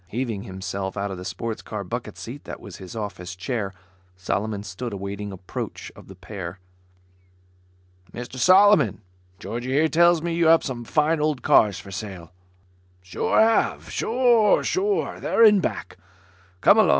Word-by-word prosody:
Heaving 115 Hz, 0 st, -3 dB
himself 95 Hz, +1 st, -5 dB
out 100 Hz, 0 st, -2 dB
of 95 Hz, -, -5 dB
the -, -, -7 dB
sports 105 Hz, +4 st, -4 dB
car -, -, -6 dB
bucket -, -, -6 dB
seat -, -, -8 dB
that -, -, -7 dB
was -, -, -10 dB
his 95 Hz, +3 st, -10 dB
office 100 Hz, -4 st, -6 dB
chair, 100 Hz, +1 st, -3 dB, 0.5 s
Solomon 100 Hz, +2 st, -2 dB
stood 105 Hz, +4 st, -6 dB
awaiting 100 Hz, +1 st, -5 dB
approach 95 Hz, -2 st, -7 dB
of -, -, -14 dB
the 95 Hz, -, -12 dB
pair. 90 Hz, -1 st, -7 dB, 1.5 s
"Mr 120 Hz, +4 st, -8 dB
Solomon, 195 Hz, -, +5 dB, 0.4 s
Georgie 120 Hz, +7 st, -4 dB
here 155 Hz, +3 st, +4 dB
tells 170 Hz, 0 st, +4 dB
me 170 Hz, -1 st, -1 dB
you 165 Hz, -1 st, +2 dB
have 165 Hz, 0 st, +6 dB
some 120 Hz, -4 st, -5 dB
fine 155 Hz, +5 st, +1 dB
old 150 Hz, -3 st, 0 dB
cars 100 Hz, -3 st, +4 dB
for 100 Hz, -, -11 dB
sale?" 95 Hz, -4 st, -7 dB, 0.7 s
"Sure 90 Hz, -, 0 dB
have. 225 Hz, 0 st, +2 dB
Sure 235 Hz, -3 st, +3 dB
have. 400 Hz, +3 st, -1 dB
They're 230 Hz, -, +3 dB
in 210 Hz, -2 st, +7 dB
back. -, -, -4 dB, 0.6 s
Come -, -, +6 dB
along. -, -, +5 dB
110 Hz, 155 wpm, -24 LUFS, -, 1.5 s, in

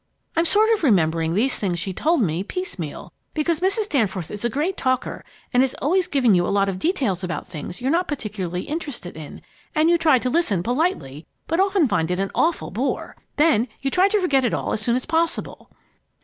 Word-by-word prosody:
I'm 330 Hz, +1 st, +2 dB
sort 430 Hz, +5 st, +3 dB
of 435 Hz, -, -1 dB
remembering 165 Hz, -, +2 dB
these 250 Hz, +6 st, +1 dB
things 185 Hz, -4 st, -1 dB
she 185 Hz, +3 st, -3 dB
told 315 Hz, -, +2 dB
me, 170 Hz, 0 st, -1 dB
piecemeal, 200 Hz, -, -6 dB, 0.2 s
because 315 Hz, +1 st, 0 dB
Mrs. 390 Hz, +4 st, 0 dB
Danforth 195 Hz, -, -1 dB
is 210 Hz, +1 st, -6 dB
a 235 Hz, -, +1 dB
great 305 Hz, -, -1 dB
talker 255 Hz, -1 st, -1 dB, 0.3 s
and 250 Hz, -, +5 dB
is 265 Hz, -1 st, +1 dB
always 360 Hz, +5 st, +1 dB
giving 250 Hz, -7 st, +3 dB
you 175 Hz, -1 st, +4 dB
a -, -, -1 dB
lot 200 Hz, 0 st, +2 dB
of 190 Hz, -1 st, -3 dB
details 240 Hz, -, 0 dB
about 180 Hz, -, -3 dB
things 165 Hz, +7 st, -8 dB
you're 260 Hz, +2 st, 0 dB
not 345 Hz, +3 st, +1 dB
particularly 200 Hz, -, -4 dB
interested 285 Hz, -, -5 dB
in, 155 Hz, -2 st, -10 dB, 0.3 s
and 315 Hz, +2 st, +4 dB
you 340 Hz, -, +3 dB
try 310 Hz, -5 st, +5 dB
to 255 Hz, -, -2 dB
listen 220 Hz, -, +1 dB
politely, 240 Hz, -, -1 dB, 0.2 s
but 330 Hz, +2 st, -1 dB
often 385 Hz, -5 st, +3 dB
find 165 Hz, -7 st, 0 dB
it 180 Hz, +1 st, -1 dB
an 195 Hz, 0 st, -1 dB
awful 330 Hz, 0 st, 0 dB
bore. 240 Hz, +9 st, -2 dB, 0.2 s
Then 275 Hz, -7 st, +3 dB
you 270 Hz, 0 st, -2 dB
try 370 Hz, +6 st, +4 dB
to 420 Hz, +1 st, +2 dB
forget 285 Hz, -8 st, +2 dB
it 240 Hz, -, +1 dB
all -, -, -2 dB
as 220 Hz, -, -1 dB
soon 235 Hz, +2 st, +2 dB
as 255 Hz, -, -2 dB
possible!" 325 Hz, +1 st, -2 dB
255 Hz, 210 wpm, -22 LUFS, -, 0.3 s, and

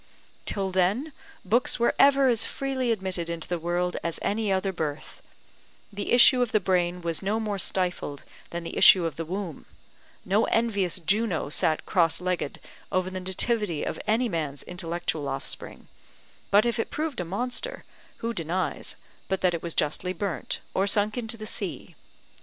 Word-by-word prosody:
Till 195 Hz, -1 st, -1 dB
then 200 Hz, -, +1 dB, 0.3 s
books 240 Hz, +5 st, +3 dB
were 235 Hz, -, +3 dB
ever 275 Hz, -1 st, +6 dB
as 230 Hz, -3 st, +3 dB
freely 260 Hz, -2 st, -1 dB
admitted 185 Hz, -5 st, -2 dB
into 170 Hz, -1 st, -5 dB
the 175 Hz, -1 st, -2 dB
world 175 Hz, +2 st, -1 dB
as 170 Hz, -1 st, -1 dB
any 210 Hz, 0 st, 0 dB
other 190 Hz, 0 st, 0 dB
birth; 155 Hz, -4 st, -5 dB, 0.7 s
the 205 Hz, 0 st, -4 dB
issue 250 Hz, +1 st, +7 dB
of 245 Hz, -2 st, +1 dB
the 215 Hz, -, +4 dB
brain 180 Hz, -2 st, 0 dB
was 165 Hz, -1 st, -1 dB
no 205 Hz, +3 st, 0 dB
more 210 Hz, -3 st, -2 dB
stifled 180 Hz, -6 st, -1 dB, 0.3 s
than 170 Hz, 0 st, -5 dB
the 165 Hz, -, -4 dB
issue 185 Hz, -4 st, +8 dB
of 165 Hz, -, -2 dB
the 165 Hz, -, -4 dB
womb: 180 Hz, -2 st, -5 dB, 0.6 s
no 205 Hz, +4 st, +3 dB
envious 200 Hz, -7 st, +1 dB
Juno 185 Hz, -2 st, +1 dB
sat 155 Hz, +1 st, +1 dB
cross 170 Hz, -5 st, +2 dB
legged 180 Hz, -5 st, -2 dB, 0.3 s
over 185 Hz, 0 st, 0 dB
the 185 Hz, -, -4 dB
nativity 190 Hz, -1 st, 0 dB
of -, -, -3 dB
any 230 Hz, +4 st, +2 dB
man's 155 Hz, -7 st, -3 dB
intellectual 175 Hz, -4 st, -3 dB
offspring; 135 Hz, 0 st, -5 dB, 0.6 s
but 205 Hz, +3 st, +5 dB
if 235 Hz, -1 st, 0 dB
it -, -, -1 dB
proved 305 Hz, -5 st, -3 dB
a -, -, 0 dB
monster, 245 Hz, -, -2 dB, 0.4 s
who 235 Hz, -, -1 dB
denies, 170 Hz, -3 st, -2 dB, 0.3 s
but 190 Hz, 0 st, -1 dB
that 180 Hz, -2 st, +3 dB
it 170 Hz, -, -3 dB
was 170 Hz, -2 st, -4 dB
justly 170 Hz, +5 st, 0 dB
burnt, 180 Hz, -6 st, -3 dB
or 195 Hz, +1 st, +1 dB
sunk 205 Hz, +1 st, +4 dB
into 230 Hz, -2 st, -3 dB
the 215 Hz, -, -7 dB
sea? -, -, -3 dB
190 Hz, 170 wpm, -26 LUFS, 170-220 Hz, 0.7 s, issue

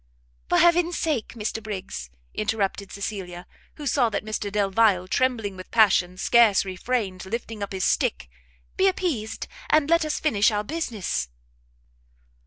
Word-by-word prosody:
"For -, -, +3 dB
heaven's 345 Hz, 0 st, +4 dB
sake, 295 Hz, -9 st, -1 dB
Mr 220 Hz, 0 st, -3 dB
Briggs," 190 Hz, -, -6 dB, 0.2 s
interrupted 205 Hz, -2 st, -2 dB
Cecilia, 190 Hz, -3 st, -5 dB, 0.3 s
who 300 Hz, -, -8 dB
saw 255 Hz, -3 st, +2 dB
that 205 Hz, -1 st, -3 dB
Mr 215 Hz, -1 st, -3 dB
Delvile, 200 Hz, -2 st, +2 dB
trembling 225 Hz, -3 st, 0 dB
with 185 Hz, 0 st, -10 dB
passion, 190 Hz, -5 st, +3 dB
scarce 220 Hz, -1 st, +4 dB
refrained 190 Hz, 0 st, -2 dB
lifting 225 Hz, 0 st, -5 dB
up 200 Hz, -, -4 dB
his 190 Hz, -1 st, -3 dB
stick, 60 Hz, -, 0 dB, 0.5 s
"be 385 Hz, -, +4 dB
appeased, 310 Hz, -, -1 dB, 0.2 s
and 310 Hz, 0 st, +3 dB
let 335 Hz, -1 st, +5 dB
us 305 Hz, -1 st, -2 dB
finish 220 Hz, -10 st, +3 dB
our 210 Hz, -1 st, -1 dB
business!" 220 Hz, -, -3 dB
215 Hz, 140 wpm, -25 LUFS, 195-255 Hz, 0.5 s, let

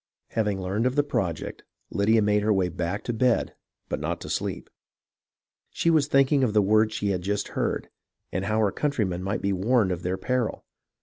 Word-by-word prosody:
Having 105 Hz, -3 st, 0 dB
learned 100 Hz, +6 st, 0 dB
of 130 Hz, -, -1 dB
the 145 Hz, -, +3 dB
project, 90 Hz, -, -3 dB, 0.3 s
Lydia 110 Hz, +2 st, +3 dB
made 105 Hz, 0 st, +3 dB
her 105 Hz, +1 st, +2 dB
way 95 Hz, -3 st, +2 dB
back 90 Hz, +4 st, -3 dB
to 120 Hz, -, -2 dB
bed, 125 Hz, +1 st, +1 dB, 0.3 s
but -, -, -3 dB
not -, -, -2 dB
to -, -, -6 dB
sleep. -, -, -3 dB, 1.0 s
She 170 Hz, -, +1 dB
was 155 Hz, -3 st, +3 dB
thinking 135 Hz, -1 st, +4 dB
of 115 Hz, -5 st, +1 dB
the 105 Hz, -, +5 dB
words 110 Hz, +2 st, +3 dB
she 100 Hz, -, -1 dB
had 90 Hz, -2 st, 0 dB
just 100 Hz, +2 st, -2 dB
heard, -, -, -2 dB, 0.4 s
and 95 Hz, +2 st, -2 dB
how 110 Hz, +2 st, +1 dB
her 105 Hz, -2 st, +2 dB
countrymen 105 Hz, -11 st, -1 dB
might 100 Hz, +4 st, -2 dB
be 100 Hz, 0 st, +1 dB
warned 100 Hz, +1 st, +2 dB
of 90 Hz, -1 st, -3 dB
their 90 Hz, +1 st, -2 dB
peril. 125 Hz, -1 st, -2 dB
105 Hz, 195 wpm, -26 LUFS, 95-120 Hz, 1.0 s, the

